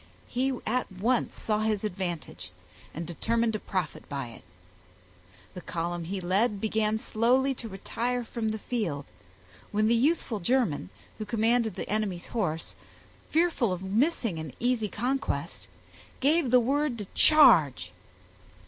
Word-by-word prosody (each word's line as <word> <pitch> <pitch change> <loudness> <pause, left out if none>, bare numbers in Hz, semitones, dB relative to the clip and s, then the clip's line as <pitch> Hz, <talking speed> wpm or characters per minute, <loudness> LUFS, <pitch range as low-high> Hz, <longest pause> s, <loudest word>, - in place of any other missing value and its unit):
He 260 +2 0
at 250 -1 -1
once 225 +7 0
saw 215 -1 0
his 215 -1 0
advantage, 180 -5 -4 0.4
and 165 +2 -5
determined 230 +7 0
to 215 - -2
profit 185 -6 -4
by 140 -4 -4
it. 115 - -12 1.1
The 180 - -7
column 170 0 -3
he 190 +3 -3
led 200 +4 +1
began 220 0 +1
slowly 250 +5 +2
to 235 -3 -7
retire 240 +5 -2
from 225 -1 -3
the 220 - -2
field, 195 - -3 0.7
when 215 +1 +2
the 230 - +4
youthful 245 -2 +1
German, 190 - +1 0.3
who - - -2
commanded 225 -1 +1
the - - -5
enemy's 205 -4 -1
horse, 165 -9 -2 0.6
fearful 320 - +2
of 180 +1 -3
missing 220 - 0
an 155 -5 -6
easy 240 -3 +1
conquest, 255 +7 -2 0.5
gave 295 0 +3
the 250 +1 +6
word 275 +1 0
to 205 - -5
charge. 235 - +6
220 Hz, 140 wpm, -28 LUFS, 185-245 Hz, 1.1 s, the